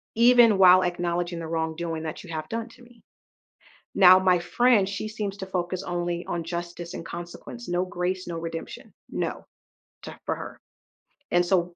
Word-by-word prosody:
even 235 Hz, -3 st, +6 dB
while 185 Hz, -1 st, +7 dB
acknowledging 175 Hz, -1 st, -2 dB
the 165 Hz, -, -5 dB
wrongdoing 160 Hz, 0 st, -3 dB
that 160 Hz, +3 st, -6 dB
you 175 Hz, -, -12 dB
have 155 Hz, -1 st, -4 dB
done 230 Hz, +1 st, -4 dB
to 245 Hz, +1 st, -18 dB
me. 240 Hz, -2 st, -19 dB, 0.9 s
Now, 185 Hz, -1 st, +8 dB
my 185 Hz, -1 st, +3 dB
friend, 205 Hz, +2 st, +3 dB
she 205 Hz, +2 st, -4 dB
seems 210 Hz, -2 st, -4 dB
to 190 Hz, -, -5 dB
focus 180 Hz, -1 st, -3 dB
only 175 Hz, 0 st, -3 dB
on 170 Hz, -1 st, -3 dB
justice 175 Hz, 0 st, -6 dB
and 165 Hz, -, -6 dB
consequence, 175 Hz, +8 st, -8 dB
no 175 Hz, +1 st, 0 dB
grace, 185 Hz, 0 st, -3 dB
no 170 Hz, -1 st, -4 dB
redemption, 165 Hz, 0 st, -7 dB, 0.2 s
no, -, -, -4 dB, 0.6 s
to -, -, -9 dB
for -, -, 0 dB
her. -, -, -9 dB, 0.7 s
And, 175 Hz, 0 st, +3 dB
so 175 Hz, -1 st, +1 dB
175 Hz, 170 wpm, -26 LUFS, 170-195 Hz, 0.9 s, Now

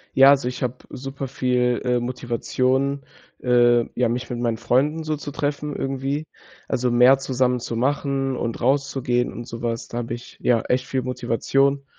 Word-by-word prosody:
Ja, 135 Hz, +1 st, +8 dB
also, 135 Hz, -3 st, +3 dB
ich 125 Hz, -, -6 dB
habe 125 Hz, 0 st, -1 dB, 0.2 s
super 135 Hz, +1 st, -6 dB
viel, 125 Hz, -2 st, +1 dB
äh, 125 Hz, -1 st, +2 dB
Motivation, 130 Hz, +3 st, -1 dB, 0.4 s
äh, 120 Hz, -1 st, +5 dB
ja, 125 Hz, -1 st, +2 dB
mich 125 Hz, +2 st, -2 dB
mit 120 Hz, -1 st, -4 dB
meinen 115 Hz, -2 st, 0 dB
Freunden 145 Hz, +7 st, +1 dB
so 155 Hz, 0 st, -1 dB
zu 145 Hz, 0 st, -7 dB
treffen, 145 Hz, +1 st, -3 dB
irgendwie. 135 Hz, +3 st, -2 dB, 0.4 s
Also, 125 Hz, 0 st, 0 dB
mehr 125 Hz, +3 st, +6 dB
zusammen 125 Hz, -2 st, 0 dB
zu 115 Hz, -1 st, -4 dB
machen 135 Hz, +1 st, 0 dB
und 115 Hz, -2 st, -3 dB
rauszugehen 130 Hz, -2 st, +1 dB
und 120 Hz, 0 st, -7 dB
sowas. 115 Hz, 0 st, -4 dB
Da 120 Hz, -, -5 dB
habe 120 Hz, 0 st, -3 dB
ich, 120 Hz, +1 st, -11 dB
ja, 120 Hz, -2 st, +3 dB
echt 125 Hz, 0 st, 0 dB
viel 130 Hz, -1 st, -1 dB
Motivation. 135 Hz, +3 st, 0 dB
125 Hz, 170 wpm, -23 LUFS, 120-135 Hz, 0.4 s, Ja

